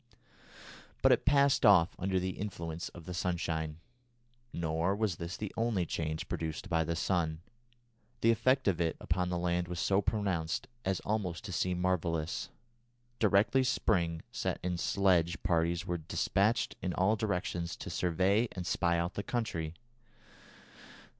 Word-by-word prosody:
But - - +7
it - - +3
passed 140 0 +4
off 90 -4 +6
under 95 0 +1
the 95 +1 -1
influence 85 -5 -5
of 85 -2 -12
the 90 - -5
sunshine. 80 -3 -2 0.7
Nor 85 +3 0
was 100 -5 -1
this 85 +3 -5
the 105 -2 -5
only 110 -6 +1
change 80 -1 -3
produced 80 +4 -4
by 80 -2 +2
the 85 +1 -2
sun. 80 -2 0 0.8
The 115 - +5
effect 130 +3 +2
of 90 -3 +2
it 80 -1 0
upon 90 +2 -1
the 90 - -1
land 85 0 0
was 90 -1 -4
so 95 +3 +2
pronounced 100 0 -1 0.2
as 95 -1 -1
almost 100 -5 -2
to 105 - -6
seem 90 +1 0
marvellous. 85 -3 -1 0.7
Directly 110 +5 +4
spring 85 -9 +1
set - - -2
in 90 -1 -1
sledge 85 -4 +2
parties 85 0 +1
were 85 0 -2
despatched 100 +7 +1
in 90 - -2
all 95 +4 +3
directions 90 -5 -2
to - - -7
survey 95 +6 +2
and 90 -2 -5
spy 85 0 +1
out 85 +2 -1
the - - -3
country. 85 -8 -3
90 Hz, 150 wpm, -32 LUFS, 85-100 Hz, 0.8 s, But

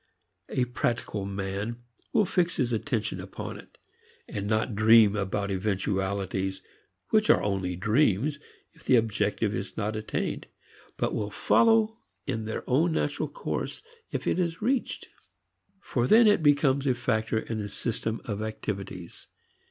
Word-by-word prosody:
A 125 - +1
practical 115 -4 -2
man 100 +4 -4 0.3
will 210 - +3
fix 180 -1 +1
his 120 -2 0
attention 110 -2 -2
upon - - -7
it, - - -16 0.5
and 100 0 -4
not 110 +2 +1
dream 110 0 +6
about 100 0 -1
eventualities 95 -1 -1 0.5
which - - +3
are - - +5
only 95 -3 -1
dreams 115 - +2 0.3
if - - -20
the 130 - +4
objective 115 -3 +1
is - - -5
not 105 +2 -1
attained, 110 0 -3 0.5
but - - 0
which - - -1
will 105 -1 -2
follow 225 - +3 0.3
in 110 -1 -2
their 110 - -5
own 160 +6 +3
natural 145 -2 -1
course - - -4 0.3
if - - -3
it - - +1
is 170 -2 -1
reached. 250 +4 -1 0.7
For 125 -10 -1
then 230 - +7
it 205 -5 +5
becomes 145 -2 +3
a 130 - +3
factor 115 -2 0
in 110 0 -3
the 105 -1 -4
system 110 +1 -3
of 105 -2 -3
activities. 100 -5 -6
110 Hz, 145 wpm, -28 LUFS, 100-140 Hz, 0.7 s, then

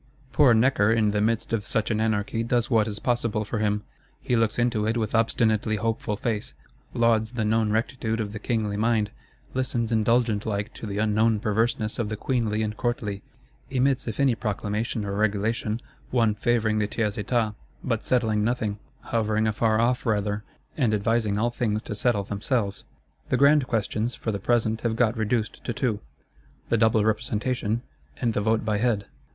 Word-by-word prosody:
Poor 135 -6 +6
Necker 110 -2 +3
in 110 -2 +3
the 105 0 0
midst 115 +1 0
of 110 -3 0
such 110 +2 -1
an 110 0 0
anarchy 110 0 0
does 120 +2 0
what 110 -2 +4
is 105 -1 -4
possible 115 -2 0
for 110 +2 -3
him. 105 -1 0 0.4
He 125 - 0
looks 115 -1 +1
into 120 -3 +1
it 115 +2 +1
with 110 -2 -2
obstinately 110 -1 +2
hopeful 110 -1 -2
face; 110 -1 -3 0.4
lauds 115 -1 +2
the 115 -3 -1
known 110 0 +2
rectitude 115 0 -1
of 105 -2 -3
the 110 - -5
kingly 110 -2 -1
mind; 110 -1 +1 0.4
listens 120 -3 -1
indulgent 115 -1 +2
like 100 -1 -2
to 110 - -7
the 105 +1 0
known 110 +1 +2
perverseness 110 +1 0
of 110 -3 -1
the 110 - -3
queenly 110 -3 0
and 105 0 -3
courtly;—emits 125 +4 -2
if 110 +1 -4
any 135 -3 +4
proclamation 105 0 -2
or 100 - -3
regulation, 105 +2 0 0.3
one 115 -4 +2
favouring 110 0 +1
the 105 - +1
Tiers 105 -1 -1
Etat; 110 0 0 0.3
but 115 -3 -1
settling 110 -4 +1
nothing; 110 -3 -1 0.2
hovering 110 -1 0
afar 110 0 +2
off 125 +2 +1
rather, 105 -1 0 0.3
and 120 -7 +2
advising 105 0 +1
all 120 +3 +1
things 110 -3 -1
to - - -5
settle 105 -1 +1
themselves. 100 +1 -2 0.4
The - - +2
grand 140 -1 +5
questions, 110 +1 -1
for 110 - -3
the 100 - -3
present, 110 +1 +1
have 115 -2 0
got 115 -1 +2
reduced 110 0 -1
to 120 - -2
two: 115 -3 -1 0.7
the 115 - +3
Double 110 -1 +3
Representation, 110 +1 -1 0.4
and 120 -3 0
the 105 - 0
Vote 110 +1 +1
by 105 -1 0
Head. 110 -4 +1
110 Hz, 175 wpm, -25 LUFS, 105-120 Hz, 0.7 s, Poor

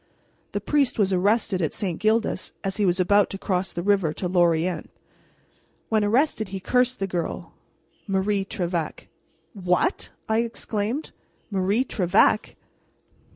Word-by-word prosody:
The - - 0
priest 285 -3 +1
was 195 -3 +2
arrested 195 0 +2
at 160 - -1
St. 185 -6 -2
Gildas 220 +2 0
as 195 0 -2
he 205 -2 +2
was 180 +1 +1
about 200 +2 +4
to 195 - -5
cross 190 -1 -1
the 170 - -4
river 195 -6 +2
to 180 - -3
Lorient. 175 -1 +1 1.0
When 220 -1 +2
arrested 225 +1 +1
he 190 0 -5
cursed 250 +5 +1
the 195 - -1
girl, 175 -3 -4 0.5
Marie 195 +1 +1
Trevec 175 -5 -3 0.2
" - - -39
"What!" 190 - 0 0.2
I 220 0 +2
exclaimed, 230 +3 -2 0.4
"Marie 200 +6 +1
Trevec!" 195 0 +2
195 Hz, 140 wpm, -24 LUFS, 180-220 Hz, 1.0 s, about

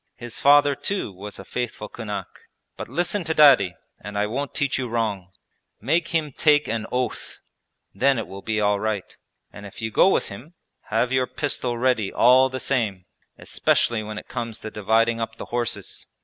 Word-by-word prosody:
His 120 -1 -6
father 145 0 +6
too 190 - -3
was 100 +3 -9
a - - -10
faithful 120 -3 -4
kunak. 105 -3 -5 0.5
But - - -7
listen 175 - -1
to 160 0 -1
Daddy 130 -12 +6 0.2
and 105 +1 -7
I 105 - +2
won't 135 +6 -4
teach 140 -2 0
you 130 - -2
wrong: 110 -6 -2 0.5
make 160 +9 +1
him 160 -3 -1
take 150 +1 +3
an 115 -1 -2
oath, 125 0 -3 0.6
then 135 +6 +2
it 115 - -2
will 100 +1 -9
be 110 0 -1
all 105 -1 +2
right. 105 -2 -3 0.4
And 100 - -10
if 100 - -13
you 110 -1 -3
go 190 - +5
with - - +1
him, 130 - -11 0.3
have 115 +3 0
your 130 -1 +2
pistol 130 -4 -3
ready 120 -5 +1
all 130 +2 +5
the 130 0 -5
same, 110 -9 -1 0.3
especially 115 -2 +1
when 105 0 -7
it - - -8
comes 115 -3 -5
to 110 - -6
dividing 115 +2 +1
up 115 0 -4
the - - -8
horses. 120 -2 -3
115 Hz, 185 wpm, -23 LUFS, 105-135 Hz, 0.6 s, father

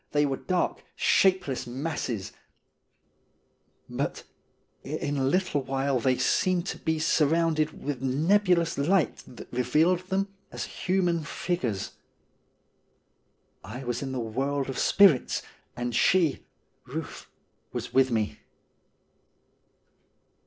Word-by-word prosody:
They 145 0 +3
were 135 -2 -1
dark, 180 -1 -1
shapeless 185 -10 +2
masses; 125 -6 -3 1.6
but - - -3 0.6
in 145 0 -3
a 135 - 0
little 180 +1 +1
while 135 0 0
they 130 +1 +2
seemed 185 -1 +1
to - - -5
be 160 -1 0
surrounded 155 0 +1
with 140 -3 -3
nebulous 170 +5 +2
light 170 +4 +2
that 125 - -12
revealed 150 +9 +3
them 195 +1 -1 0.2
as - - -4
human 180 -3 0
figures. 150 - -2 1.7
I 120 +7 -7
was 120 -1 -2
in 135 -1 -4
the 130 - -3
world 135 +5 -2
of 135 - -3
spirits 190 -10 +4 0.3
and 120 0 -2
she 170 +4 +2 0.4
(Euth) - - -6 0.4
was - - -5
with 130 0 +4
me. 110 -3 -1
145 Hz, 110 wpm, -27 LUFS, 130-175 Hz, 1.7 s, spirits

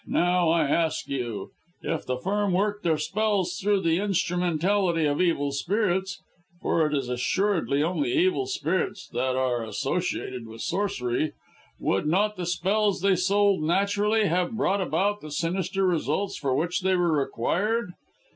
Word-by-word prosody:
Now, 175 -1 +2
I 165 -2 +3
ask 160 +2 0
you, 120 -6 -4 0.3
if 165 - -3
the 125 0 -1
Firm 200 +6 0
worked 205 +2 0
their 160 -2 +2
spells 200 -3 0
through 200 0 +2
the 165 0 +2
instrumentality 180 -2 +1
of 145 +2 +1
evil 155 -5 +1
spirits 190 +3 -1 0.4
for 160 -3 +1
it 150 - -1
is 135 -3 -1
assuredly 145 +4 0
only 185 - 0
evil 375 +3 +2
spirits 200 - -2
that 130 +2 -1
are 125 -2 0
associated 130 -1 -3
with 110 0 -9
Sorcery 155 -7 -1 0.5
would 95 +10 0
not 205 +6 +2
the 180 -2 -4
spells 195 +2 +1
they 195 0 +3
sold 195 0 +2
naturally 200 +6 +2
have 180 +2 0
brought 200 -1 +1
about 190 +5 0
the 155 - -8
sinister 185 +5 -1
results 180 +2 0
for 135 -3 -1
which 175 +6 0
they 190 0 +2
were 175 -2 +2
required? 180 - 0
180 Hz, 150 wpm, -26 LUFS, 150-200 Hz, 0.5 s, I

